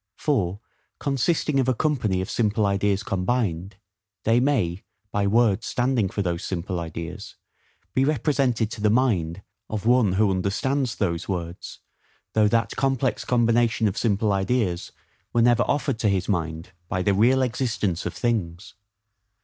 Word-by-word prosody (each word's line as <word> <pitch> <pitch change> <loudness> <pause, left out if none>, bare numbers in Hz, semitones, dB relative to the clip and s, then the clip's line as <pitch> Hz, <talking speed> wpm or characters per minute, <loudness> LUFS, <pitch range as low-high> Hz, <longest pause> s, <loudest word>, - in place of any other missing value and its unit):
For, 100 - 0 0.4
consisting 140 +1 0
of 130 - +1
a 130 - +2
company 115 -10 0
of 95 - -5
simple 110 -1 +1
ideas 100 0 +1
combined, 95 -3 -1 0.5
they 115 +2 +3
may, 110 -10 +1 0.3
by 100 -1 0
words 110 -1 +2
standing 120 -5 +1
for 100 - -2
those 85 -2 -2
simple 90 0 -3
ideas, 85 0 -7 0.6
be 130 - +2
represented 135 -6 +1
to 110 - -7
the 105 - +3
mind 100 -7 +1 0.3
of 110 -1 -4
one 120 -5 +4
who 100 +1 +3
understands 115 +7 -1
those 85 -3 -2
words, 85 -2 -5 0.5
though 110 -1 +4
that 115 +2 +1
complex 135 -3 0
combination 120 -2 +2
of 100 - -2
simple 105 -2 +1
ideas 95 -2 -1 0.4
were 115 - +3
never 120 -1 +4
offered 135 -4 0
to 110 - +2
his 95 -2 0
mind 80 -3 -2 0.2
by 90 0 -1
the 100 - +2
real 125 +7 +4
existence 115 -8 -1
of 90 - -6
things. 95 -7 -2
105 Hz, 150 wpm, -24 LUFS, 95-125 Hz, 0.6 s, one